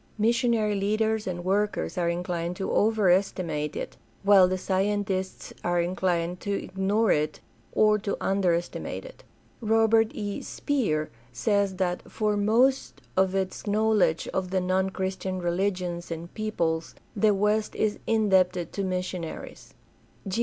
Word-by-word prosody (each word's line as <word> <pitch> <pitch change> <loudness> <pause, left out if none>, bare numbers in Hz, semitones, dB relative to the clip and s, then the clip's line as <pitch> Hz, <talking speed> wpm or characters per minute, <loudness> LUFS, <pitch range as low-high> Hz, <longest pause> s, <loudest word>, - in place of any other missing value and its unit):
Missionary 230 -1 +2
leaders 215 +2 0
and 175 -1 -4
workers 205 +2 0
are 175 -2 +1
inclined 175 0 -2
to 195 - -3
overestimate 185 -7 +1
it, - - -5 0.3
while 195 -2 +7
the 185 0 -1
scientists 190 0 -1
are 175 0 +1
inclined 175 0 0
to 200 - -4
ignore 200 +3 0
it 150 0 0 0.3
or 215 0 +4
to 200 0 -3
under 195 -3 +2
estimate 175 - -4
it. - - -13 0.4
Robert 225 0 +4
E, 205 -1 -4
Speer 195 - -1 0.2
says 200 - +1
that 180 -1 -1
"for 210 -1 0
most 235 +6 +2
of 190 0 +2
its 190 +2 -2
knowledge 210 -5 +2
of 185 -1 -2
the 190 0 +1
non 185 +1 +1
Christian 190 0 -3
religions 175 -1 -1
and 165 +1 -6
peoples 170 -7 -2 0.2
the 210 0 +3
West 210 +2 +1
is 215 -1 0
indebted 190 -5 +2
to 200 - -2
missionaries." 180 -2 -5
190 Hz, 130 wpm, -27 LUFS, 180-210 Hz, 0.4 s, while